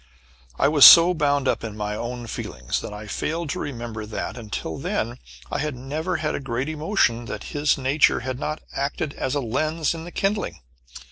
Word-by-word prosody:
I - - +3
was 145 -2 +5
so 170 +1 +11
bound 145 -4 +1
up - - 0
in 110 -2 -6
my 105 0 -3
own 120 +2 -5
feelings 60 - -4
that - - -7
I 105 +1 -8
failed 155 +8 -3
to - - -3
remember 115 -5 -5
that, 110 0 -4
until 105 -8 -5
then, - - -2 0.3
I - - -1
had 150 -2 -2
never 155 +8 -3
had 155 -1 -1
a - - -2
great 135 +1 -3
emotion 150 - +1
that - - -6
his 145 0 +2
nature 135 +3 +2
had 130 0 -4
not 155 +1 -4
acted 140 +1 -2
as 130 - -2
a 145 - 0
lens 155 +7 0
in 165 -1 -7
the 175 - -9
kindling. 200 - -2
140 Hz, 195 wpm, -24 LUFS, 115-155 Hz, 0.3 s, so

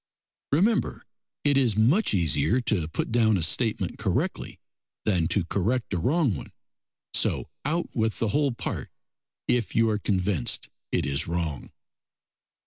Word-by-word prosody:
Remember 205 +10 +1 0.4
it 145 -1 +3
is 120 -6 +2
much 130 - +3
easier 90 - +2
to 100 -9 0
put 80 - -3
down 110 -3 +4
a 85 - -1
statement 110 +7 0
correctly - - -2 0.5
than 90 -6 +2
to 95 -1 0
correct 110 +6 -1
a 90 - 0
wrong 135 - +2
one; - - -8 0.6
so - - 0 0.2
out 165 +4 -1
with 110 -1 +1
the 115 - 0
whole 145 +3 +2
part 120 - -4 0.6
if 120 -3 +1
you 115 0 +4
are 105 - 0
convinced 95 - 0 0.2
it - - +1
is 70 0 -1
wrong. 80 -5 -3
110 Hz, 140 wpm, -26 LUFS, 90-130 Hz, 0.6 s, down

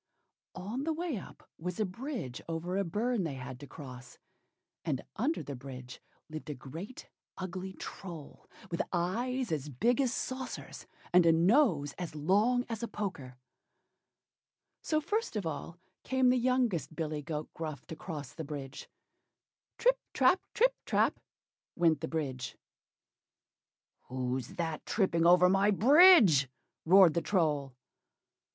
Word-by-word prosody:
On 210 +9 -4
the 320 +1 0
way 330 -2 -2
up 190 - -11
was 180 +3 -4
a 215 - +2
bridge 210 - -5
over 165 +3 -3
a 200 - +1
burn 210 +5 0
they 155 -5 -3
had 130 -1 -7
to 145 - -10
cross; 125 -5 -10 0.7
and 150 -6 -2
under 285 +10 0
the 140 - -6
bridge 125 -1 -9 0.3
lived 155 0 -8
a 150 - -3
great 165 - -9 0.3
ugly 185 +1 -5
Troll, 170 -6 -9 0.2
with 170 - 0
eyes 235 +8 -1
as 150 -2 -2
big 235 - +2
as 260 -3 +1
saucers, 260 0 -5 0.3
and 175 -1 +6
a - - +7
nose 170 - +3
as 175 -4 -5
long 210 - +2
as 225 -2 -4
a 235 - -2
poker. 145 - -5 1.4
So 310 -1 0
first 430 - -2
of 205 -4 -2
all 160 +2 -5 0.2
came 260 -1 +2
the - - +3
youngest 245 - +1
billy 155 -2 -3
goat 150 0 -5
Gruff 155 -3 -6
to 160 - -7
cross 150 -5 -7
the 160 - -6
bridge. 140 -2 -7 0.9
"Trip, - - +3 0.2
trap! 360 +8 +4
trip, - - +4
trap!" - - +1 0.6
went 165 -4 +3
the - - -2
bridge. 135 -6 -4 1.5
"Who's 130 -1 -3
that 165 -2 -3
tripping 170 -5 +2
over 180 +1 +7
my 195 +2 +4
bridge?" 225 - +7 0.4
roared 185 -1 +7
the 170 - +1
Troll. 150 -8 0
175 Hz, 140 wpm, -31 LUFS, 150-235 Hz, 1.5 s, a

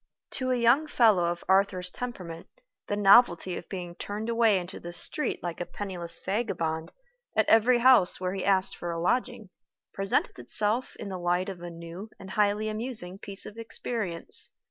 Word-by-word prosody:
To 255 -1 -2
a 255 - +3
young 245 +6 +4
fellow 215 - +4
of 170 0 -2
Arthur's 190 -2 +2
temperament, 180 -10 -6 0.4
the 205 - -1
novelty 195 -3 +5
of - - -8
being 180 -3 -5
turned 210 +5 -5
away 230 -3 +4
into 180 +1 -6
the 175 - -7
street 300 +11 -2
like 175 0 -4
a - - -2
penniless 175 -4 -3
vagabond, 165 -7 -2 0.4
at 215 -1 +3
every 230 +3 +5
house 240 -7 +5
where 185 0 -2
he 195 - -3
asked 190 -1 +2
for 175 - -5
a 165 0 -3
lodging, 230 +2 -1 0.4
presented 195 -8 0
itself 210 - -1
in - - -7
the 185 -1 -5
light 175 +2 0
of 185 -3 -7
a 175 - -6
new 170 +5 -9
and 190 0 -10
highly 210 +1 +1
amusing 215 -4 -4
piece 200 0 -5
of 215 +2 -9
experience. 220 -6 -3
195 Hz, 175 wpm, -28 LUFS, 175-225 Hz, 0.4 s, novelty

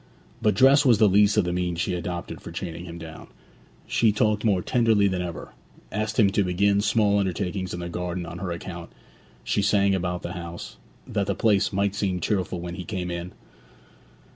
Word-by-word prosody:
But 105 -2 +2
dress 135 +6 +6
was 125 -6 +5
the 110 0 +5
least 105 +2 +4
of 105 - +5
the 90 - -1
means 90 -1 -2
she 90 - 0
adopted 85 0 -5
for - - -9
chaining 85 0 -6
him 85 -1 -8
down. 80 -1 -10 0.6
She 115 -2 +3
talked 105 0 +1
more 100 -5 +2
tenderly 115 -5 +3
than 95 -2 -1
ever; 85 -2 -6 0.4
asked 110 +2 -2
him 100 -3 +5
to 100 - +2
begin 100 +3 +2
small 105 -1 +2
undertakings 95 0 -2
in 90 - -5
the 85 - -4
garden 90 0 -4
on 85 +1 -7
her 95 -1 -4
account; 85 0 -7 0.5
she - - 0
sang 100 -1 +3
about 90 -1 -2
the 85 - -4
house, 85 -1 -8 0.3
that - - -2
the - - 0
place 105 -4 +2
might 100 0 0
seem 100 -3 -1
cheerful 90 -1 -1
when 85 0 -6
he 90 - -6
came 90 -1 -4
in. 85 +1 -5
95 Hz, 195 wpm, -25 LUFS, 90-105 Hz, 0.6 s, dress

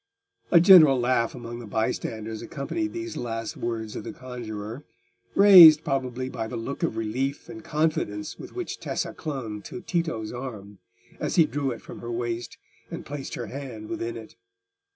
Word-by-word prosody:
A 170 - +7
general 165 -7 +8
laugh 120 -1 +1
among 120 -1 -7
the 120 - -9
bystanders 110 0 -3
accompanied 320 - -3
these 345 0 -6
last 115 -2 -4
words 115 -2 -4
of - - -5
the - - -6
conjuror, 120 -1 -7 0.5
raised, 175 -6 +10
probably, 130 -1 -2
by 115 -4 -4
the 120 - -5
look 115 +5 -5
of 110 - -1
relief 130 +7 -2
and 165 -1 -9
confidence 150 -10 -1
with - - -10
which 365 -1 -5
Tessa - - -3
clung 125 -9 -5
to 185 - -8
Tito's 165 - -2
arm, 105 -6 -8 0.4
as - - -2
he 165 - +6
drew 145 -2 -2
it 120 -3 -6
from - - -10
her 120 - -6
waist, 120 -1 -4 0.3
and - - -7
placed 145 -1 -6
her 120 - -4
hand 120 -6 -8
within 115 0 -4
it. 110 -1 -11
125 Hz, 170 wpm, -26 LUFS, 115-150 Hz, 0.5 s, raised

